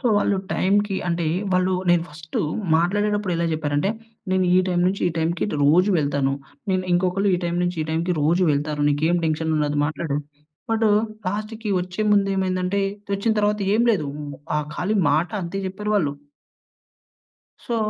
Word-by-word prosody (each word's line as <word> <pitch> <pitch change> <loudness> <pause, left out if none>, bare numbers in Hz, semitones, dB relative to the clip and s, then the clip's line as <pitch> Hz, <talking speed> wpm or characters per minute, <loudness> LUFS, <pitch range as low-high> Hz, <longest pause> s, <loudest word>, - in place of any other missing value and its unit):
So, 255 - -1
వాళ్ళు 205 -1 +2 0.2
టైమ్‌కి 200 +1 +1
అంటే, 170 -1 0 0.3
వాళ్ళు 185 0 +2 0.2
నేను 175 -1 +4
ఫస్టు 155 +1 -5 0.3
మాట్లాడేటప్పుడెలా 190 0 +1
జెప్పారంటే, 150 +3 0 0.4
నేను 185 0 +2
ఈ - - +6
టైమ్ 175 -1 +1
నుంచి 195 +2 -1
ఈ - - -2
టైమ్‌కిటు 165 +1 -1
రోజు 180 +7 +4
వెళ్తాను. 140 -2 0 0.4
నేను 185 0 0
ఇంకొకళ్ళు 185 +3 +1
ఈ - - 0
టైమ్ 170 +1 -1
నుంచి 175 -1 -1
ఈ - - -4
టైమ్‌కి 170 +3 0
రోజూ 170 +5 +3
వెళ్తారు. 150 +1 -1
నీకేం 155 +4 +2
టెన్షనుండదు 155 -2 0
మాట్లాడు, 150 -1 -2 0.5
బట్టు 225 -1 +2 0.4
లాస్ట్‌కి 215 +2 -4
ఒచ్చే 180 +4 -3
ముందేమైందంటే, 195 -1 +1 0.3
తెచ్చిన 200 +3 +1
తర్వాత 210 0 +1 0.2
ఏం 235 - +3
లేదూ. 155 -9 -1
హ్మ్, 145 -1 -7 0.2
ఆహ్, 150 - -2
ఖాళీ 205 +4 0
మాట 160 +4 +1
అంతే 180 +3 -4
చెప్పారు 210 +3 -3
వాళ్ళు. 145 -7 0 1.5
సో, 235 - -1
180 Hz, 150 wpm, -23 LUFS, 155-200 Hz, 1.5 s, ఈ